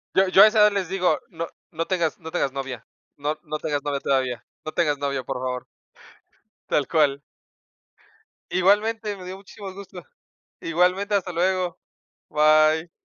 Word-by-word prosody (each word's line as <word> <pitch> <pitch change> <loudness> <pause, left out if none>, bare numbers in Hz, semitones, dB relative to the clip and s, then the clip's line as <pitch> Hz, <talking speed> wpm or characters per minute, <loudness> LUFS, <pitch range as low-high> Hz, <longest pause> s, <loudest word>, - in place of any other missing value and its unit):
Yo 190 0 +5
yo 190 +1 +8
a 215 - +9
esa 215 0 +2
edad 210 0 +7
les 195 -4 -2
digo, 185 -1 +1
no 165 0 -5 0.2
no 165 - -3
tengas 170 -4 0
no 160 -2 -8
tengas 150 -5 -1
novia. 135 -4 -5 0.3
No 150 +2 -2
no 155 -2 -4
tengas 150 -2 -2
novia 145 -1 -1
todavía. 130 -3 -1 0.2
No 155 - -5
tengas 150 -4 +1
novia, 140 -2 -2
por 135 0 -4
favor. 125 -1 -4 1.0
Tal 140 -3 +1
cual. 145 -3 +2 1.3
Igualmente, 210 +3 +2
me 185 - -10
dio 185 +1 -7
muchísimo 195 0 -10
gusto. 190 -2 -10 0.6
Igualmente, 180 +5 +1
hasta 185 -2 0
luego. 180 0 0 0.5
Bye. 155 +2 +4
165 Hz, 155 wpm, -24 LUFS, 145-190 Hz, 1.3 s, a